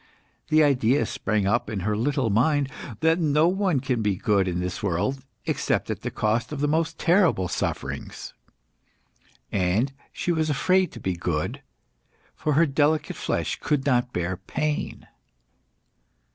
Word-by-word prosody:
The 155 0 +5
idea 135 -1 +3
sprang 105 -2 -1
up 100 +2 +1
in 105 -4 -3
her 105 +3 0
little 125 0 0
mind 135 +5 +2 0.3
that 160 +2 +3
no 155 0 +3
one 185 -5 +1
can 125 -2 -1
be 105 -2 +1
good 100 -1 +1
in 90 -1 -1
this 90 +1 -3
world 105 +8 -1 0.2
except - - 0
at - - -4
the - - -3
cost 110 +4 -1
of 150 - -4
the 145 - +1
most 160 +2 0
terrible 170 - +3
sufferings. 70 -4 -4 1.2
And 100 +8 +1 0.2
she 175 - -2
was 160 -2 0
afraid 185 +6 +2
to 120 - -8
be 95 -3 -1
good, 85 -3 -2 0.7
for 150 - -1
her 165 +4 +5
delicate 150 +2 +1
flesh - - -2
could 145 -3 0
not 125 -3 +2
bear 90 -1 -2
pain. 150 +8 -3
130 Hz, 150 wpm, -25 LUFS, 100-155 Hz, 1.2 s, The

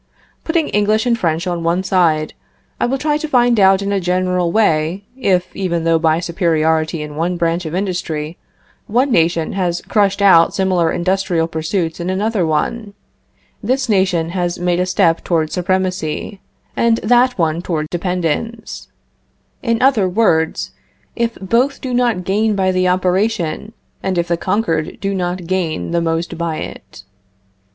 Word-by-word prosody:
Putting 320 -2 0
English 210 +2 +1
and 240 -1 +2
French 170 -5 -1
on 175 -2 -2
one 170 +3 0
side, 165 -5 +1 0.5
I - - +1
will 270 +2 0
try 295 +2 0
to 310 +1 -4
find 245 -4 +3
out 195 0 +5
in 200 - -2
a 200 - +1
general 180 -1 0
way, 175 -3 +1
if, 190 -9 0
even 175 -4 -1
though 165 0 +2
by 160 0 +2
superiority 160 -2 0
in 150 -1 -8
one 175 +3 -1
branch 170 0 -1
of 155 - -4
industry, 175 -5 -3 0.5
one 255 +5 +1
nation 165 -4 +2
has 175 -3 -1
crushed 200 -2 +1
out 185 -5 +5
similar 185 -4 +1
industrial 180 -2 0
pursuits 165 +1 -2
in 175 +1 -3
another 195 -1 0
one, 200 +7 -2 0.7
this 255 +4 0
nation 185 -6 +1
has 175 0 -2
made 175 0 0
a 180 - 0
step 180 -3 +2
toward 160 -3 0
supremacy, 185 0 -2 0.3
and 230 -1 +2
that 245 +3 +3
one 165 -1 0
toward 160 -4 -2
dependence; 180 +5 -3 0.7
in 230 -2 0
other 225 -9 +3
words, 175 -6 +1 0.4
if 235 -1 -1
both 240 +8 +1
do 255 -2 -4
not 240 -7 +1
gain 210 +3 +1
by 190 -1 +1
the 185 0 +1
operation, 185 +1 0 0.3
and 190 -2 -2
if 170 0 0
the 170 - +2
conquered 170 -4 -1
do 195 0 -2
not 180 -1 -3
gain 170 -3 -2
the 170 0 +1
most 165 +1 -2
by 170 -2 -2
it. 100 -8 -9
180 Hz, 160 wpm, -17 LUFS, 165-205 Hz, 0.7 s, out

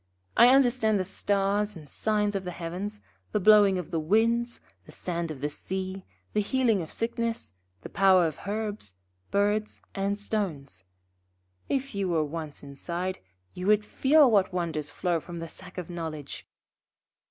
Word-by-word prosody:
I 240 - +8
understand 245 -5 +4
the 185 - -1
stars 200 +2 0
and 155 -3 -11
signs 210 +5 0
of 195 -1 -2
the 180 - -4
heavens, 180 +5 -5 0.3
the 210 - +2
blowing 205 -1 +6
of 180 - -5
the 165 - 0
winds, 230 +8 +2 0.3
the - - -11
sand 170 -2 -3
of 145 -4 -7
the 145 - 0
sea, 190 +3 -5 0.3
the 210 - +2
healing 230 -2 +2
of 160 - -7
sickness, 230 - -2 0.3
the - - -7
power 190 -2 +5
of 155 -3 -3
herbs, 205 - -4 0.3
birds, 205 +1 0
and 200 0 -1
stones. 170 - -4 0.9
If 275 -1 -1
you 200 -2 -1
were 165 -3 +2
once 155 -1 -6
inside, 170 +6 -4 0.3
you 180 +1 -5
would 210 0 +4
feel 280 +3 +5
what 195 -3 +3
wonders 165 -5 -2
flow 175 -2 -1
from 170 +2 -9
the 165 0 -5
Sack 180 +3 -12
of 180 -3 -4
Knowledge.' 160 -5 -6
195 Hz, 160 wpm, -28 LUFS, 170-215 Hz, 0.9 s, I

